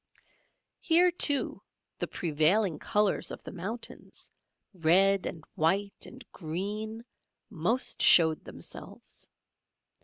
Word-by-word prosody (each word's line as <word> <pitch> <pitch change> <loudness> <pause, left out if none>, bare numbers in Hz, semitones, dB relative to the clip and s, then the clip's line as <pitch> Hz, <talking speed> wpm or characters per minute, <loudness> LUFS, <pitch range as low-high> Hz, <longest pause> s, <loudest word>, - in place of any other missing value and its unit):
Here, 350 +1 +4
too, 290 -5 +1 0.4
the - - -3
prevailing 165 +3 0
colours 210 -1 0
of - - -9
the - - -9
mountains, 200 +7 -8 0.5
red 195 +3 +3
and 160 - -8
white 195 +6 -1
and 255 -1 -13
green, 205 +7 -5 0.5
most 215 +8 0
showed 160 -2 +6
themselves. - - -10
195 Hz, 95 wpm, -28 LUFS, 165-220 Hz, 0.5 s, showed